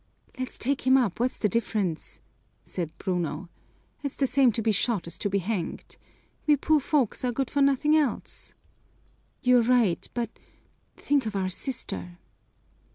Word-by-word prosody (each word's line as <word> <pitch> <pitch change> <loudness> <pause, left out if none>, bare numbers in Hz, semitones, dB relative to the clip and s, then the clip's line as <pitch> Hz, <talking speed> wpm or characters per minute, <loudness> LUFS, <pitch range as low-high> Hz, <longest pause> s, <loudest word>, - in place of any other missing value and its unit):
"Let's 255 -1 -4
take 265 +1 -1
him 260 +1 +7
up, 230 -8 +1
what's 250 +2 0
the 210 - +2
difference?" 205 -5 -2 0.4
said 170 -4 -4
Bruno. 175 -2 -2 0.5
"It's 280 -2 -4
the 275 - +1
same 255 -1 +4
to 225 - -1
be 220 - +3
shot 215 -1 +1
as 170 - -6
to 205 - -1
be 200 - +1
hanged. 190 -2 -4 0.5
We 300 - +7
poor 305 +2 +3
folks 270 -5 0
are 250 - +1
good 265 +2 -2
for 285 - +1
nothing 280 +2 +4
else." 300 -5 -1 0.9
"You're 250 -1 +6
right 230 -6 +2
but 235 -2 -1 0.7
think 280 -5 +1
of 210 - -4
our 190 -1 0
sister!" 95 - -4
235 Hz, 160 wpm, -27 LUFS, 190-270 Hz, 0.9 s, him